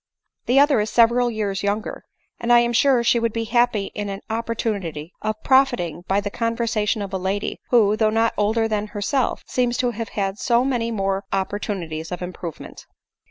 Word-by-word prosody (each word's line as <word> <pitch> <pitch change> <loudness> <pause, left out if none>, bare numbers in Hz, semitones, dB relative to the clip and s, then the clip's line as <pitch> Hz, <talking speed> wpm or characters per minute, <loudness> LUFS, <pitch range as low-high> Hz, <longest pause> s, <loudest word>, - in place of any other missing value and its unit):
The 255 +3 +5
other 285 -3 +5
is 210 +1 -1
several 240 +2 +4
years 205 -3 -2
younger; 205 +2 -2 0.4
and 235 - -1
I 240 - +8
am 240 0 0
sure 255 0 +4
she 235 0 +3
would 230 -1 0
be 230 +1 -2
happy 225 -3 +1
in 205 -1 -4
an 195 0 -5
opportunity 205 -8 -3
of 215 0 -3
profit 265 -2 +4
ing 170 -1 -4
by 195 +1 +2
the 205 0 -4
conversation 230 -2 -1
of 195 -1 -7
a 190 - -1
lady, 195 +2 -2
who, 215 -4 +4
though 215 0 +2
not 225 +1 +1
older 220 +2 +1
than 210 -1 -2
herself, 215 +5 -1
seems 245 -1 0
to 245 -1 +1
have 230 -1 -5
had 195 0 -3
so 240 -1 +2
many 240 -4 0
more 195 -3 -1
oppor 195 +1 -1
tunities 165 -6 -5
of 180 0 -4
improvement." 175 -2 -8
215 Hz, 195 wpm, -22 LUFS, 200-235 Hz, 0.4 s, I